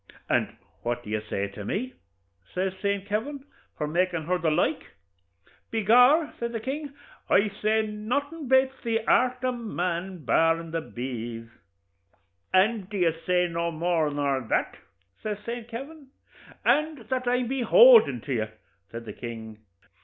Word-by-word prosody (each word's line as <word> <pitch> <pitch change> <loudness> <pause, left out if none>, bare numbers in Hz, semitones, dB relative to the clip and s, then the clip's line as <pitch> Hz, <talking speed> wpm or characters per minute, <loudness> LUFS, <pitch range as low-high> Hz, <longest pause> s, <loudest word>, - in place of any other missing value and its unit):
'And - - 0 0.2
what 120 0 -2
do 105 - -8
you 110 0 -1
say 100 -2 -3
to 100 +1 -9
me,' 245 - -3 0.6
says 185 +1 0
Saint 200 -1 -1
Kavin, 230 +8 -3 0.3
'for 150 - -1
makin' 170 +1 0
her 180 +3 0
the 160 -1 +1
like?' 155 - 0 0.8
'By 225 - 0
gor,' 250 - +5
says 235 0 -3
the 225 - -2
king, 280 +4 -5 0.3
'I 210 +1 +4
say 220 +1 +2
nothin' 265 +9 -3
bates 265 +1 +4
the 225 -2 -1
art 255 0 +2
o' 255 - +2
man, 180 - -3
barrin' 165 +6 +2
the 165 0 -1
bees.' 120 -4 -6 1.0
'And 195 +1 +2
do 210 - -4
you 170 -3 +3
say 180 -1 +3
no 170 0 -2
more 165 -1 0
nor 140 -2 0
that?' 115 - -1 0.5
says 210 -1 -3
Saint 235 -1 -5
Kavin. 275 +5 -8 0.6
'And 300 -6 +1
that 255 -1 -1
I'm 250 0 +1
behoulden 270 - +6
to 135 - -4
you,' 110 -3 0 0.4
says 115 0 -8
the - - -7
king. 110 -2 -8
200 Hz, 155 wpm, -26 LUFS, 155-245 Hz, 1.0 s, behoulden